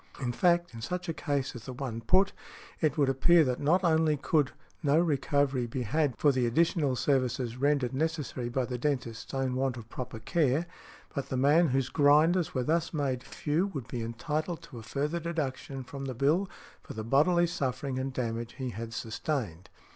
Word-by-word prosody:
In 125 -3 -1
fact, 175 +4 +2
in 115 - -8
such 180 +8 -3
a - - 0
case 145 -4 -2
as 120 0 -9
the 130 - -5
one 125 -3 -4
put, 190 - +3 0.5
it 155 -2 +1
would 145 -2 +3
appear 160 +6 +5
that 125 -3 -1
not 170 +6 +2
only 160 -3 +3
could 145 0 +1 0.3
no 145 -1 +3
recovery 140 -5 +1
be 125 +2 -3
had 140 +2 0
for 145 - +4
the 130 -3 +1
additional 150 +1 +2
services 125 -2 0
rendered 135 -2 +1
necessary 145 -4 -2
by 125 +1 0
the 125 0 -4
dentist's 125 -5 -2
own 135 -1 -1
want 130 -1 0
of 115 -1 -10
proper 125 -1 -6
care, 145 +6 +1 0.5
but 140 - -4
the 130 - -1
man 150 +6 +5
whose 130 -1 0
grinders 155 +5 +4
were 130 - +1
thus 165 +3 0
made 135 -4 -1
few 150 +7 -1
would 140 - -6
be 120 - -4
entitled 155 +9 -3
to 120 - -10
a - - -8
further 145 +8 -2
deduction 145 -5 -3
from 135 +2 -7
the 130 -2 -4
bill 155 - +2 0.3
for - - -10
the 110 - -4
bodily 155 +9 +4
suffering 135 -5 -2
and 135 +1 -2
damage 115 -2 -3
he 130 -2 -4
had 115 +1 -6
sustained. 110 - -3
135 Hz, 190 wpm, -29 LUFS, 125-155 Hz, 0.5 s, appear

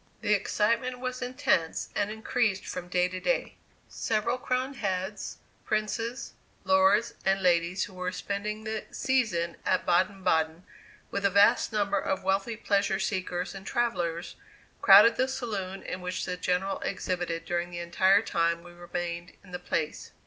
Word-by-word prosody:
The 210 - +2
excitement 230 +5 +1
was 255 0 -4
intense 250 - 0
and 205 0 0
increased 220 -2 0
from 180 -1 -5
day 180 0 +2
to 185 0 -5
day. 260 +8 0 0.3
Several 230 +3 -1
crowned 255 +2 -2
heads, 190 0 -3 0.3
princes, 225 +3 -2 0.3
lords 285 -6 +4
and 195 0 +2
ladies 175 0 +2
who 200 - -7
were 180 0 -3
spending 205 +3 -4
the 220 0 -4
season 215 -11 0
at - - +1
Baden 190 +2 +2
Baden, 160 -1 +1 0.5
with 200 - -2
a 200 - +4
vast 200 +6 +4
number 200 -2 +1
of 190 - -2
wealthy 195 +4 0
pleasure 200 -3 +1
seekers 185 -2 -2
and 195 -1 -9
travellers, 175 -8 -1 0.5
crowded 210 +4 +8
the 260 - +2
saloon 205 -8 -4
in 185 - -5
which 180 +1 -3
the 180 - -3
General 180 +2 -1
exhibited 175 -2 -3
during 175 0 -1
the 175 - -7
entire 190 +4 +3
time 170 -4 0
we 175 - -12
remained 175 0 -5
in 185 - -16
the 180 - -5
place. 155 -3 -3
195 Hz, 155 wpm, -28 LUFS, 180-220 Hz, 0.5 s, crowded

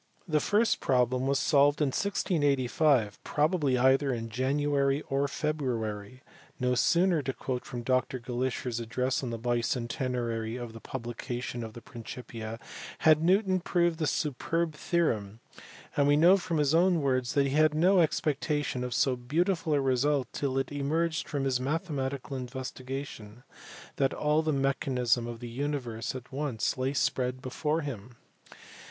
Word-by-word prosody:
The 155 -3 +2
first 215 +8 +2
problem 125 0 +1
was 140 0 +2
solved 145 +1 +3
in 150 -3 +2
1685, 140 - +1
probably 150 -3 +1
either 135 +2 +3
in 115 -2 -3
January 140 +2 +1
or 140 +1 +1
February. 125 -7 -3 0.4
"No 125 0 +1
sooner," 170 +5 +3
to 135 - -2
quote 125 -1 -4
from 125 -5 -6
Dr 130 +1 +1
Glaisher 125 +1 -3
s 120 -1 -3
address 125 +5 -1
on 130 - -3
the 115 - -3
bicentenary 120 0 -2
of 120 -2 -7
the 115 - -9
publication 120 0 -5
of 110 -1 -7
the 120 - -11
Principia, 115 -1 -8 0.5
"had 155 -1 +6
Newton 185 +2 +3
proved 175 -2 +1
this 155 -3 +1
superb 160 +3 -1
theorem 115 - -1 0.6
and 145 -1 +3
we 145 0 +5
know 175 +5 +7
from 170 -4 -2
his 145 0 +2
own 175 0 +4
words 130 -3 0
that 140 - +4
he 135 - -1
had 155 0 +4
no 180 +4 +4
expectation 145 -4 0
of 125 -1 -3
so 130 -2 +2
beautiful 160 +6 0
a - - +3
result 135 +1 +1
till 135 -2 -1
it 135 0 -1
emerged 160 +4 -1
from 140 -3 -2
his 130 -2 +1
mathematical 140 -2 -3
investigation 130 -2 -6 0.5
than 135 0 +2
all 150 +1 +2
the 160 -1 0
mechanism 130 -4 +1
of 120 -1 -6
the 120 - -5
universe 125 -3 -3
at 125 -1 -8
once 135 -5 -1
lay 130 +1 -1
spread 130 -2 0
before 150 +5 -1
him. 125 -5 -7
135 Hz, 155 wpm, -29 LUFS, 125-150 Hz, 0.6 s, know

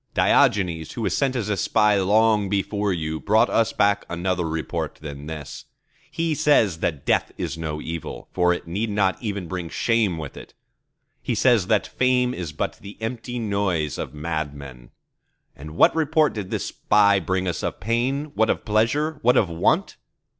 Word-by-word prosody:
Diogenes, 85 -6 +2
who 115 - -4
was - - 0
sent 135 -2 0
as 115 -5 -2
a 105 - 0
spy 105 +2 +2
long 105 +1 +3
before 100 +1 -1
you, 80 -3 -3
brought 110 +6 +3
us 115 0 +2
back 100 0 +2
another 90 -1 -1
report 80 0 -3
than 75 -1 -8
this. 80 -3 -7 0.4
He 165 -1 -1
says 140 - +3
that 75 -5 -2
Death - - +1
is - - -3
no 80 -2 -4
evil; 80 0 -6
for 90 -1 +3
it 90 - -2
need 100 +7 -2
not 100 -2 0
even 100 -6 -4
bring 90 -1 -5
shame 110 -6 +1
with 75 -3 -7
it. - - -12 0.7
He - - -2
says 120 -7 +3
that 110 0 +2
Fame 125 -1 +1
is 85 -7 -5
but 75 - -4
the 100 +1 -11
empty 120 +2 -4
noise 100 -9 -1
of - - -4
madmen. 70 -5 -5 0.7
And 75 +3 -10
what - - +5
report 155 -1 +2
did 100 -4 -5
this - - -2
spy 100 -1 +3
bring 95 +1 -1
us 90 - -2
of - - -3
Pain, 125 +8 -1
what 110 -4 +2
of - - -1
Pleasure, 140 +9 +1
what 125 +2 +4
of 95 - +3
Want? 85 - +1
100 Hz, 175 wpm, -23 LUFS, 85-115 Hz, 0.7 s, what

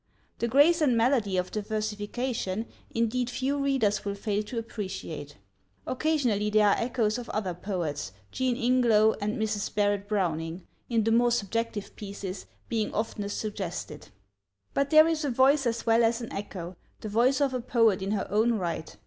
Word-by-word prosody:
The 235 - 0
grace 290 +8 +5
and 255 -6 +3
melody 225 -5 +2
of 180 0 -1
the 215 - -2
versification, 215 0 -3 0.2
indeed, 230 +2 0
few 270 +3 -1
readers 265 -7 +1
will 200 0 -3
fail 205 0 -1
to 215 +3 -7
appreciate. 190 -10 -6 0.5
Occasionally 250 -8 +1
there 210 -1 +4
are - - +4
echoes 230 -2 0
of 240 - -8
other 195 -4 -2
poets 170 - -3 0.2
Jean 255 -2 0
Ingelow 235 -4 +4
and 210 +1 -1
Mrs. 215 -2 -1
Barrett 205 -1 +1
Browning, 170 -4 -2 0.2
in 230 -2 +2
the 225 - +1
more 240 +1 +4
subjective 230 -1 -2
pieces, 200 -2 -7 0.2
being 220 -2 -1
oftenest 205 -2 -2
suggested. 185 -8 -5 0.6
But 280 0 +1
there 310 +1 +7
is 325 -1 0
a 290 - 0
voice 265 +2 +4
as 230 0 -2
well 230 0 +4
as 230 +1 +2
an 235 - -7
echo 185 -3 -6 0.2
the - - -5
voice 245 +6 +3
of 280 -2 +1
a 250 - -1
poet 230 -5 +3
in 190 - -2
her 210 -1 0
own 220 +3 +3
right. 170 -5 -4
220 Hz, 170 wpm, -28 LUFS, 200-245 Hz, 0.6 s, there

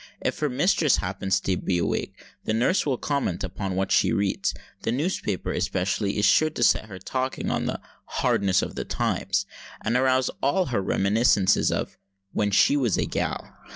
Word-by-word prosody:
If - - -2
her 150 - 0
mistress 155 +1 +2
happen 95 +1 -4
to 95 0 +1
be 90 0 -1
awake, 85 - -2 0.3
the 110 - 0
nurse 125 - +2
will 130 -3 +1
comment 140 - -2
upon 95 +1 -4
what 95 0 -1
she - - +4
reads. 100 -1 0 0.3
The 115 - -1
newspaper, 130 - -2
especially, 100 +2 -1
is 105 - +2
sure 155 - +4
to 120 - -2
set 110 - +3
her 100 -4 -9
talking 130 +8 -3
on - - -1
the - - -3 0.3
"hardness 95 -1 +1
of - - -5
the - - -4
times," 100 +1 -1 0.3
and 115 - -1
arouse 130 0 +2
all 180 +7 +2
her 120 -6 -1
reminiscences 100 +1 +2
of - - -3 0.3
"when 105 - 0
she 100 +7 +4
was 125 -9 +1
a - - +1
gal." - - -3
105 Hz, 180 wpm, -25 LUFS, 95-130 Hz, 0.3 s, she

